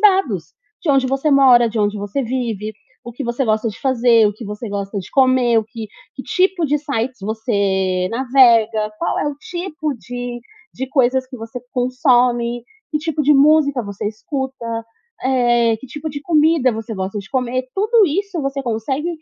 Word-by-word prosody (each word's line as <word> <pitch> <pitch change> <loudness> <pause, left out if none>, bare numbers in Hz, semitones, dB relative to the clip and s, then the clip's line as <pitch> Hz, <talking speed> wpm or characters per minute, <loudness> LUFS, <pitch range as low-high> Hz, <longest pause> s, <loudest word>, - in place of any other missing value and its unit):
dados. 260 - +2 0.3
De 345 - -4
onde 270 -1 +3
você 270 +3 0
mora, 255 -4 +6
de 220 0 -4
onde 205 0 0
você 205 +7 -3
vive, 225 -4 -3 0.3
o 240 - -8
que 260 +3 -6
você 235 +3 -1
gosta 220 +1 +1
de 205 - -8
fazer, 240 -4 +4
o - - -3
que 215 +3 -10
você 210 +2 -6
gosta 200 0 -4
de 185 - -8
comer, 255 -3 +3
o 220 - -1
que 225 -1 -8 0.3
que 265 - -7
tipo 370 -2 +1
de 295 +1 +1
sites 260 -4 -3
você 195 -4 0
navega, 230 -4 +3
qual - - -1
é - - -1
o 290 - -4
tipo 345 -5 -4
de 245 0 -6 0.4
de 265 - -4
coisas 260 -1 +2
que 255 -1 -9
você 225 +2 -7
consome, 245 -2 +1 0.3
que 300 - 0
tipo 310 -1 -2
de 295 - +5
música 285 -2 +4
você 200 -1 -5
escuta, 265 +3 -5 0.6
eh, 240 -3 +2
que 265 - -11
tipo 300 +5 -6
de 285 0 -6
comida 305 -5 +3
você 225 +1 -5
gosta 190 +1 -4
de 200 - -9
comer, 255 -1 -1
tudo 430 +1 +4
isso 375 +2 -2
você 275 0 -2
consegue 260 +7 -2
250 Hz, 180 wpm, -19 LUFS, 225-280 Hz, 0.6 s, mora